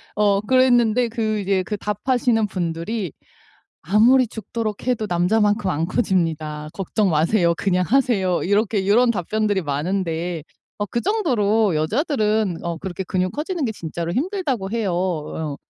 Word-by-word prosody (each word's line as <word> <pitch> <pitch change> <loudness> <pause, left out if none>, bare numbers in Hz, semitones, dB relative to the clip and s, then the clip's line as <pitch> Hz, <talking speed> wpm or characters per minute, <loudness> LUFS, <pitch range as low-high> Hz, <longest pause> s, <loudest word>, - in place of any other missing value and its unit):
어 205 -1 +2
그랬는데 245 0 +3
그 220 -2 -1
이제 195 -1 0
그 210 +3 -4
답하시는 225 +2 0
분들이 180 +1 -3 0.7
"아무리 235 +8 +4
죽도록 220 +1 -5
해도 220 -4 0
남자만큼 205 +3 +2
안 160 +1 -1
커집니다. 160 -7 -1
걱정 195 +1 0
마세요. 170 +3 +2
그냥 185 -2 +1
하세요." 210 -8 +2
이렇게 200 0 +1
요런 235 +3 +4
답변들이 205 +1 -1
많은데 165 +2 -2 0.4
어 205 - 0
그 235 - -2
정도로 225 - +1
여자들은 215 - 0
어 170 -1 -2
그렇게 190 0 -5
근육 185 0 -1
커지는 320 +3 -3
게 225 - -1
진짜로 170 -2 -5
힘들다고 275 - -2
해요 220 -5 -1
어. 160 -4 -3
205 Hz, 320 characters per minute, -21 LUFS, 175-230 Hz, 0.7 s, 아무리